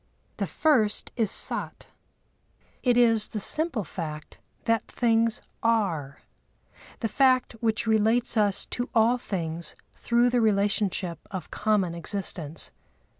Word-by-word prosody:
The -, -, -2 dB
first 240 Hz, -10 st, +1 dB
is 225 Hz, -4 st, 0 dB
Sat; -, -, +2 dB, 1.0 s
it 245 Hz, -2 st, +2 dB
is 225 Hz, -3 st, +4 dB
the 215 Hz, -, -5 dB
simple 290 Hz, 0 st, +3 dB
fact 155 Hz, -4 st, -7 dB, 0.3 s
that 230 Hz, -1 st, +1 dB
things 230 Hz, -1 st, +1 dB, 0.2 s
are, 190 Hz, -12 st, -1 dB, 0.8 s
the 225 Hz, -, 0 dB
fact 255 Hz, +3 st, +2 dB
which 225 Hz, 0 st, 0 dB
relates 225 Hz, +3 st, +2 dB
us 205 Hz, -3 st, +2 dB
to 245 Hz, +1 st, -3 dB
all 230 Hz, +2 st, +4 dB
things 170 Hz, -7 st, -5 dB, 0.2 s
through 240 Hz, +1 st, +1 dB
the 245 Hz, -1 st, +2 dB
relationship 200 Hz, -4 st, 0 dB
of 190 Hz, -3 st, -7 dB
common 210 Hz, -5 st, 0 dB
existence. 170 Hz, -3 st, -4 dB
220 Hz, 120 wpm, -26 LUFS, 190-235 Hz, 1.0 s, is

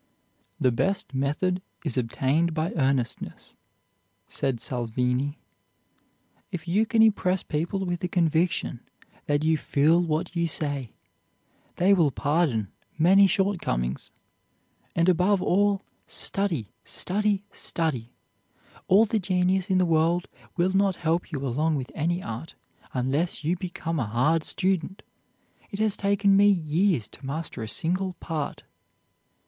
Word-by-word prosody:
"The 130 Hz, -, +3 dB
best 190 Hz, +7 st, -1 dB
method 150 Hz, +7 st, 0 dB, 0.2 s
is 145 Hz, -, -1 dB
obtained 135 Hz, +7 st, 0 dB
by 160 Hz, +1 st, -1 dB
earnestness," 135 Hz, -5 st, -1 dB, 0.7 s
said 130 Hz, -4 st, -2 dB
Salvini. 125 Hz, +4 st, -1 dB, 1.1 s
"If 175 Hz, -3 st, -6 dB
you 205 Hz, +6 st, +2 dB
can 225 Hz, 0 st, +4 dB
impress 190 Hz, -4 st, +2 dB
people 175 Hz, +5 st, -2 dB
with 175 Hz, -1 st, -2 dB
the 180 Hz, -, -2 dB
conviction 165 Hz, -6 st, +1 dB, 0.5 s
that 145 Hz, +1 st, +1 dB
you 160 Hz, 0 st, +2 dB
feel 155 Hz, +5 st, +3 dB
what 170 Hz, +1 st, -2 dB
you 170 Hz, 0 st, +1 dB
say, 145 Hz, -6 st, -3 dB, 0.8 s
they 190 Hz, +3 st, +4 dB
will 170 Hz, -6 st, +4 dB
pardon 140 Hz, -, 0 dB, 0.3 s
many 190 Hz, +5 st, +6 dB
shortcomings. 165 Hz, -, -1 dB, 0.9 s
And 170 Hz, +1 st, +2 dB
above 185 Hz, +3 st, +3 dB
all, 200 Hz, +2 st, +2 dB, 0.2 s
study, 170 Hz, -, -1 dB
study, 205 Hz, +1 st, 0 dB
study! 130 Hz, -8 st, -2 dB, 0.8 s
All 205 Hz, +4 st, +6 dB
the 220 Hz, 0 st, 0 dB
genius 185 Hz, +1 st, +1 dB
in 190 Hz, -, +3 dB
the 185 Hz, -, +3 dB
world 165 Hz, +1 st, +2 dB, 0.3 s
will 180 Hz, +2 st, +2 dB
not 195 Hz, -1 st, +3 dB
help 170 Hz, +1 st, -1 dB
you 140 Hz, -3 st, -3 dB
along 150 Hz, +5 st, 0 dB
with 130 Hz, -3 st, -4 dB
any 175 Hz, +4 st, -1 dB
art, 115 Hz, +8 st, -7 dB, 0.4 s
unless 140 Hz, +7 st, -1 dB
you 165 Hz, +4 st, +1 dB
become 170 Hz, -3 st, -4 dB
a 120 Hz, -, -1 dB
hard 145 Hz, +9 st, +2 dB
student. 190 Hz, 0 st, 0 dB, 0.7 s
It 200 Hz, -, -6 dB
has 215 Hz, -1 st, +2 dB
taken 200 Hz, 0 st, +2 dB
me 200 Hz, +1 st, +6 dB
years 170 Hz, -, +2 dB
to -, -, -9 dB
master 140 Hz, -2 st, -4 dB
a 110 Hz, -, -4 dB
single 185 Hz, -, -1 dB
part." 160 Hz, -4 st, -5 dB
165 Hz, 130 wpm, -26 LUFS, 140-185 Hz, 1.1 s, many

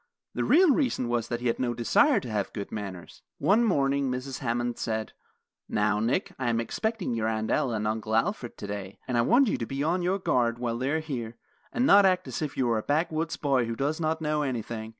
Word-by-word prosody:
The -, -, -1 dB
real 340 Hz, -1 st, +5 dB
reason 250 Hz, -, 0 dB
was 120 Hz, -1 st, 0 dB
that 120 Hz, 0 st, -3 dB
he -, -, -5 dB
had 115 Hz, -, 0 dB
no 120 Hz, -2 st, -1 dB
desire 280 Hz, -, +3 dB
to 125 Hz, -, -7 dB
have 105 Hz, -2 st, -2 dB
good 100 Hz, -1 st, -6 dB
manners. 100 Hz, -5 st, -7 dB, 0.2 s
One 220 Hz, +4 st, +3 dB
morning 140 Hz, -, +1 dB
Mrs. 130 Hz, +1 st, -4 dB
Hammond 120 Hz, -2 st, -2 dB
said: 110 Hz, -1 st, -3 dB, 0.6 s
"Now, 105 Hz, 0 st, +1 dB
Nick, 115 Hz, +4 st, 0 dB
I 130 Hz, -2 st, 0 dB
am 115 Hz, -1 st, +1 dB
expecting 215 Hz, -, -2 dB
your 110 Hz, -1 st, -1 dB
Aunt 110 Hz, 0 st, -1 dB
Ella 120 Hz, -4 st, +1 dB
and 105 Hz, 0 st, -2 dB
Uncle 110 Hz, 0 st, -2 dB
Alfred 125 Hz, -, -1 dB
today, 100 Hz, -1 st, -6 dB
and 125 Hz, -, -1 dB
I 120 Hz, -, +4 dB
want 245 Hz, -, +4 dB
you -, -, 0 dB
to 115 Hz, -, -2 dB
be 135 Hz, +1 st, -2 dB
on 170 Hz, +4 st, +1 dB
your 180 Hz, +2 st, +1 dB
guard 120 Hz, -10 st, +1 dB
while 120 Hz, -1 st, -2 dB
they 130 Hz, +2 st, -1 dB
are 160 Hz, +2 st, 0 dB
here, 120 Hz, -7 st, -5 dB, 0.3 s
and 250 Hz, +1 st, +1 dB
not 200 Hz, -5 st, +7 dB
act 185 Hz, -1 st, +1 dB
as -, -, -4 dB
if 150 Hz, -2 st, -4 dB
you 130 Hz, -, +2 dB
were 115 Hz, -2 st, +1 dB
a -, -, -3 dB
backwoods 160 Hz, +4 st, -1 dB
boy 135 Hz, -4 st, +1 dB
who 115 Hz, 0 st, -3 dB
does 145 Hz, +6 st, -1 dB
not 160 Hz, 0 st, -1 dB
know 150 Hz, 0 st, 0 dB
anything. 115 Hz, -5 st, -3 dB
125 Hz, 230 wpm, -27 LUFS, 115-160 Hz, 0.6 s, not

